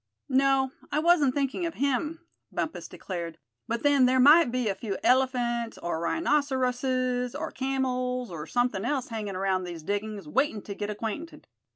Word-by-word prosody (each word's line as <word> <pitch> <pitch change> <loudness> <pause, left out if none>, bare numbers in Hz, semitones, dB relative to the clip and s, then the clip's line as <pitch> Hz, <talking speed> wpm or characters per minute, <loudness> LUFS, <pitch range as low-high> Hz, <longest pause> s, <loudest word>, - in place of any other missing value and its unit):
"No, 265 0 +3 0.2
I - - 0
wasn't 305 -5 +4
thinking 285 +5 0
of 330 - -6
him," 300 +5 -1 0.3
Bumpus - - -3
declared; 170 -3 -6 0.3
"but 230 0 -2
then 285 -3 +5
there 260 +1 +3
might 290 +1 +7
be 250 -2 0
a 200 - +1
few 195 -1 -4
elephants 245 -3 +1
or 170 -2 -3
rhinoceroses, 255 - 0
or - - -4
camels, 255 -3 -1
or 160 -2 -6
something 245 -5 0
else 260 +1 -1
hanging 210 -4 -4
around 190 0 0
these 170 -3 -7
diggings, 205 0 -3
waiting 220 - 0
to 200 - -6
get 205 +1 -4
acquainted. 225 +10 -5
250 Hz, 160 wpm, -27 LUFS, 210-270 Hz, 0.3 s, might